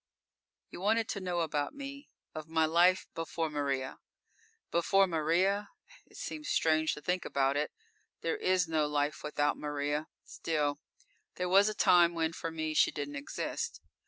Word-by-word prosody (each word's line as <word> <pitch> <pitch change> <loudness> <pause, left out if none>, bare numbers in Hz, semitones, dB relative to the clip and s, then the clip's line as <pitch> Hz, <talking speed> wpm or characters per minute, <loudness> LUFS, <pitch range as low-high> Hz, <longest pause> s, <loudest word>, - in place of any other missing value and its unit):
_You - - -7
wanted 220 +3 +2
to 200 - -2
know 180 -2 -1
about 145 -3 -1
me 280 +1 -8 0.2
of 155 0 -7
my 160 0 +3
life 175 +3 +4
before 165 -1 -3
Maria. 140 -3 -2 0.7
Before 195 +3 +4
Maria? 180 +5 +1 0.4
It - - -16
seems 305 -2 -5
strange 155 -1 +2
to 150 - -9
think 180 0 0
about 135 0 +1
it. 150 +1 -1 0.5
There - - 0
is 185 - +2
no 155 -2 +1
life 150 +1 -1
without 145 0 0
Maria. 145 +1 -2 0.2
Still, 150 -3 -1 0.6
there 180 0 -2
was 200 +3 +6
a 215 - -4
time 175 -3 +5
when 165 0 0
for 165 - -4
me 155 -1 -3
she - - +5
didn't 145 -1 -5
exist. 140 0 -4
160 Hz, 160 wpm, -31 LUFS, 150-185 Hz, 0.7 s, was